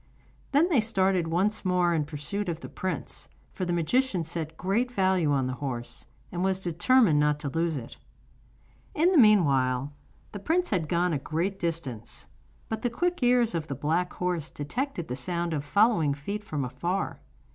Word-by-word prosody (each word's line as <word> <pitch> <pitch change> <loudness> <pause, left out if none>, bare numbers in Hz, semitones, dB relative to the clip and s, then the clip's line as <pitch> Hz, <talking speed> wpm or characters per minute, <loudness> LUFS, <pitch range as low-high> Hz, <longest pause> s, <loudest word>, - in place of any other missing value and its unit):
Then 295 +5 +4
they 285 -10 +4
started 190 -5 +1
once 190 +6 0
more 180 -2 +2
in 155 -3 0
pursuit 160 +7 -3
of 165 -1 -4
the - - -8
prince, 185 -1 -5 0.2
for 185 - -3
the 175 - -2
magician 180 +3 +1
set 160 -1 -5
great 225 +7 0
value 185 -8 +2
on 135 -2 +2
the 130 - -2
horse, 120 -4 -5 0.2
and 175 +1 -2
was 190 -1 +1
determined 180 - +3
not 150 0 +2
to 145 - -2
lose 165 +1 0
it. 120 -3 -8 1.0
In 335 +4 +4
the 350 - +5
meanwhile 140 - +4 0.4
the 205 - -6
prince 345 - 0
had 165 -7 0
gone 175 0 +1
a 145 - 0
great 175 +7 -2
distance; 140 -10 -4 0.4
but 220 -1 -4
the 245 - 0
quick 350 +8 -1
ears 245 -2 +3
of 165 -2 -2
the 140 - -4
black 160 +6 0
horse 175 -4 -2
detected 175 - -4
the 125 - -3
sound 170 +6 -2
of 145 -2 -2
following 170 -4 +3
feet 200 +9 -5
from 150 -9 -3
afar. 175 +9 -3
175 Hz, 180 wpm, -27 LUFS, 150-210 Hz, 1.0 s, the